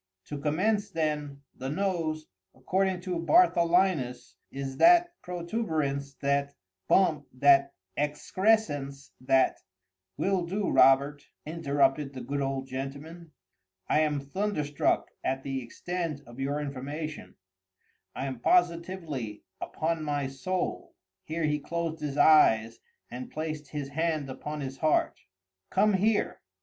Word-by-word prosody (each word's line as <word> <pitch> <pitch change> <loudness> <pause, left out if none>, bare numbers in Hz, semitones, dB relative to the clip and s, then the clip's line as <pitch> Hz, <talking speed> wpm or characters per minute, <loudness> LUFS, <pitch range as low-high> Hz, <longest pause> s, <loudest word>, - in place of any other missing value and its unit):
To 145 - -4
commence 185 +9 +1
then:—The 145 -4 -3
nose, 160 -3 -1 0.3
according 185 +6 0
to 180 -2 -3
Bartholinus, 170 - +3 0.2
is 135 -1 -5
that 345 0 +6
protuberance—that 140 - -2 0.3
bump—that 140 -5 +3 0.2
excrescence—that—" 145 -5 +1 0.6
"Will 185 -3 0
do, 195 +3 -1
Robert," 140 +2 +4 0.2
interrupted 145 -2 +1
the 130 - -7
good 140 +3 -3
old 135 -1 -2
gentleman. 140 +5 -7 0.5
"I - - +3
am 150 -2 +1
thunderstruck 150 0 -1
at 135 0 -1
the 135 -1 -3
extent 165 +4 -4
of 120 +2 -13
your 140 +2 -1
information—I 135 - -8
am 130 -3 -4
positively—upon 165 - -1
my 145 -2 -1
soul." 135 +8 -3 0.3
[Here 160 +1 -3
he 150 -1 +1
closed 165 +1 -3
his 145 -1 -3
eyes 115 -8 +5 0.3
and 125 +1 -6
placed 155 -1 -5
his 140 -1 -5
hand 155 -2 -1
upon 150 +3 -6
his 135 -1 -6
heart.] 155 -1 +1 0.5
"Come 210 +2 +3
here!" 205 +3 +1
150 Hz, 105 wpm, -28 LUFS, 135-170 Hz, 0.6 s, that